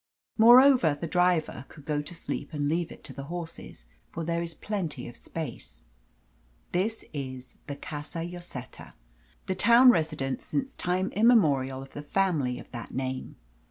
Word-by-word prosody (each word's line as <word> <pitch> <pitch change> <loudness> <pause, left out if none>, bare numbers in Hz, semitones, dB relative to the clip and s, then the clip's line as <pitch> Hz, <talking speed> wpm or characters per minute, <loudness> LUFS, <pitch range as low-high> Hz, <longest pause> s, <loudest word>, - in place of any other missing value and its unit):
Moreover, 240 - +7
the - - -3
driver 175 -5 +1
could 150 -3 -15
go 150 -1 0
to 160 +4 -8
sleep 170 - -5
and 145 -1 -1
leave 170 +2 0
it - - -12
to - - -7
the 140 - -7
horses, 165 - -7 0.2
for 165 - -5
there 170 +1 -1
is 165 -1 -4
plenty 170 -12 -4
of 120 - -10
space. 155 -8 -7 0.9
This 205 +5 -1
is 130 -3 -6
the 145 - -4
Casa 150 +3 -6
Lloseta, 175 -8 -9 0.5
the 190 - -1
town 235 +6 +7
residence 155 - -1
since 270 -1 -2
time 185 +2 -1
immemorial 145 - +3
of 135 - -15
the 145 - -6
family 150 -6 0
of - - -12
that 120 -2 -7
name. 130 0 -3
165 Hz, 160 wpm, -28 LUFS, 140-185 Hz, 0.9 s, Moreover